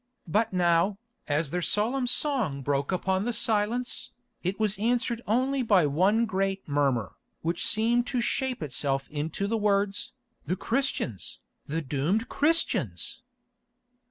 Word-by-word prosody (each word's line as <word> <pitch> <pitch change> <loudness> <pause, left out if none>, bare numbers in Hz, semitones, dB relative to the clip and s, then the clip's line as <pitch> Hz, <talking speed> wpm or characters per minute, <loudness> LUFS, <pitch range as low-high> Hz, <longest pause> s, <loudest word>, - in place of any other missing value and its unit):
But 215 +7 +1
now, 180 +2 +2 0.3
as 145 0 0
their 180 - -1
solemn 245 +8 +1
song 240 - 0
broke 140 +2 0
upon 190 +1 0
the 240 - -1
silence, 235 +1 +1 0.3
it 185 +3 -2
was 215 -2 0
answered 235 +1 0
only 260 +5 +1
by 200 -8 +4
one 190 +11 +3
great 195 -2 -2
murmur, 140 -8 0 0.3
which 165 +1 -1
seemed 235 +3 +3
to 250 - -1
shape 255 - -1
itself 135 -1 -1
to 155 +6 -3
the 225 +2 0
words, 200 -1 0 0.3
"the 180 - -1
Christians! 230 - -2 0.3
The 160 +3 -2
doomed 150 - -1
Christians!" 325 +3 +1
200 Hz, 130 wpm, -27 LUFS, 160-235 Hz, 0.3 s, by